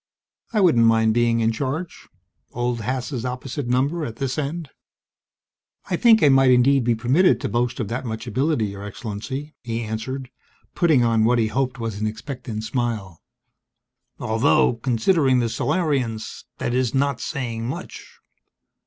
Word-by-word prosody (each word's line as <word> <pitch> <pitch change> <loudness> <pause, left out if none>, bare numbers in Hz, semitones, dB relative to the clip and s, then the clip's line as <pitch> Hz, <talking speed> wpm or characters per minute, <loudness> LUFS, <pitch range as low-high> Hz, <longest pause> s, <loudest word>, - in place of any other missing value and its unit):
I 215 -3 +2
wouldn't 120 -11 +5
mind 110 -1 +3
being 115 0 +2
in 115 0 +2
charge 140 +9 -4 0.5
old 120 -1 -1
Haas' 125 +2 -3
opposite 130 +1 -4
number 140 +7 +1
at 115 -6 -5
this 135 +3 -2
end._ 150 +1 -4 1.2
"I - - +3
think 225 -3 +5
I 145 - +7
might 135 -1 +5
indeed 130 +2 +4
be 120 0 +2
permitted 125 - +3
to - - -2
boast 120 +4 -1
of 115 - -2
that 125 +3 -3
much 110 -1 -5
ability, 130 +1 0
Your 100 -1 -6
Excellency," 120 +8 -6
he 115 -1 -3
answered, 125 +4 -5 0.4
putting 155 -8 +3
on 115 -1 +3
what 120 +2 +3
he 110 -2 +1
hoped 130 +1 -1
was 110 -3 -4
an 110 - +1
expectant 115 -1 -6
smile. 110 -7 -3 1.0
"Although, 120 +3 +2
considering 130 +4 +2
the 120 -2 +1
Solarians, 130 -8 -1
that 120 - -2
is 125 0 0
not 140 -1 +1
saying 115 -4 -3
much." 130 - -7
125 Hz, 155 wpm, -22 LUFS, 115-135 Hz, 1.2 s, I